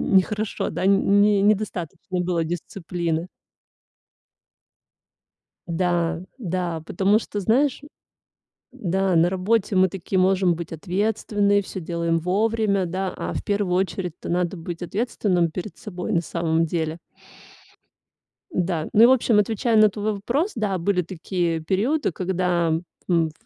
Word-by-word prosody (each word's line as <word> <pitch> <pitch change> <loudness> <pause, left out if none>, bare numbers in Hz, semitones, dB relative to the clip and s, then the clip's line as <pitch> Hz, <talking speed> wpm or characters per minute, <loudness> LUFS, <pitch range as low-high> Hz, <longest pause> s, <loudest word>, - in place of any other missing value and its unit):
нехорошо, 210 +3 +1
да, 185 - -3
нь 195 0 +5 0.2
не 205 -1 +4
недостаточно 190 -4 -1
было 175 -2 0
дисциплины. 170 0 -3 2.4
Да, 170 -1 0 0.2
да, 180 -7 -3
потому 195 +6 +2
что, 205 - -5
знаешь, 255 +8 +2 0.9
да, 190 0 0
на 170 +2 +4
работе 195 +2 0
мы 185 0 +5
такие 190 +1 -3
можем 185 -1 +3
быть 170 0 -7
ответственные, 205 +3 0
всё 190 -1 -7
делаем 170 0 -1
вовремя, 200 +2 +1
да, 185 +2 -2
а - - -4
в - - -4
первую 200 -3 0
очередь-то 180 -2 -3
надо 175 +1 0
быть 170 +1 -7
ответственным 180 -3 0
перед 180 +2 -6
собой 180 -4 -5
на 170 - +3
самом 165 -1 0
деле. 160 -1 -1 1.6
Да, 175 - -1
ну 220 - +7
и, - - +11
в 255 - +6
общем, 235 -4 +4
отвечаю 220 +2 +1
на 215 0 +7
твой 210 +1 -2
вопрос, 265 - -1
да, 205 -4 -1
были 180 +1 +1
такие 175 -1 -2
периоды, 220 - 0
когда, 180 -1 0 0.4
м 165 -3 +2
185 Hz, 130 wpm, -23 LUFS, 170-205 Hz, 2.4 s, и